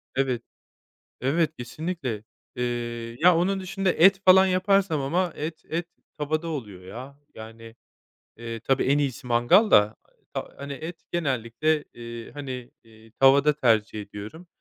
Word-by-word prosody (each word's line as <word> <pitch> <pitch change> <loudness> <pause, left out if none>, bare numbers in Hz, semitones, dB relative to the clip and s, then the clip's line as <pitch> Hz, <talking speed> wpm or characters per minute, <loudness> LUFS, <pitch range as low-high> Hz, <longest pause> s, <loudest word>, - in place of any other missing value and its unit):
Evet. 130 -3 0 0.8
Evet, 155 +4 +1
kesinlikle. 125 - -4 0.3
Eee, 120 -1 -3
ya 175 0 +6
onun 190 +3 +1
dışında 195 -1 -1
et 195 +3 +5
falan 190 +1 +7
yaparsam 185 -3 +2
ama 170 +6 0
et 155 +2 -5
et 170 +2 -2 0.3
tavada 155 +3 -1
oluyor 105 - -6
ya. 125 +9 -9 0.2
Yani, 115 +1 -11 0.6
eee, 115 -1 -6
tabii, 135 +4 +1
en 140 +2 +3
iyisi 135 -3 -2
mangal 125 - +4
da 105 +1 +5 0.4
ha - - -4
hani 140 0 -6
et 160 +5 -8
genellikle, 145 0 0
eee, 115 -1 -8
hani, 130 -4 -7
eee, 110 -1 -19
tavada 140 +2 +6
tercih 110 -6 +1
ediyorum. 105 - -9
135 Hz, 135 wpm, -25 LUFS, 115-165 Hz, 0.8 s, falan